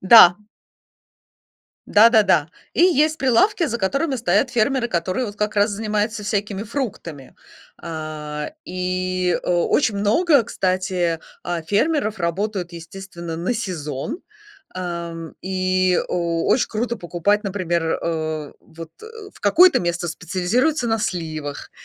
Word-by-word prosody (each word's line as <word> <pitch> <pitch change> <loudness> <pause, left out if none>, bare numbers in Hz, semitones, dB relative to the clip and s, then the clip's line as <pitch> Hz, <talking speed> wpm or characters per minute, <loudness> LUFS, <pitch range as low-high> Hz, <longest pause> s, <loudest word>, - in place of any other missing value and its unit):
Да. 185 -3 +8 1.5
Да-да-да. 205 -8 +5 0.3
И - - +3
есть 315 -3 +3
прилавки, 270 - +3
за 235 -6 -2
которыми 270 +8 0
стоят 220 +2 +1
фермеры, 240 +2 +1
которые 185 +5 -1
вот 205 -1 -8
как 210 0 -2
раз 205 +2 +3
занимаются 215 +1 -2
всякими 205 -1 -2
фруктами. 205 - -6 0.5
А, 155 -2 -5
и 185 0 -1
о 175 -1 +1
очень 225 -7 +2
много, 260 - +3
кстати, 185 -4 -1 0.2
а, 175 -2 -3
фермеров 215 - 0
работают, 180 +1 -2
естественно, 170 0 -8
на 185 +9 -1
сезон. 165 - -4 0.6
Ам, 170 -2 -5
и 185 -1 +1
о 170 -1 -1
оч 255 - +2
круто 235 +2 -2
покупать, 200 +3 0
например, 185 -4 -1 0.2
э, 155 -2 -3
вот 165 0 -11 0.4
в - - -19
какое-то 345 - +5
место 175 0 -2
специализируется 205 - 0
на 225 0 +1
сливах, 155 -7 -4
185 Hz, 120 wpm, -21 LUFS, 170-220 Hz, 1.5 s, Да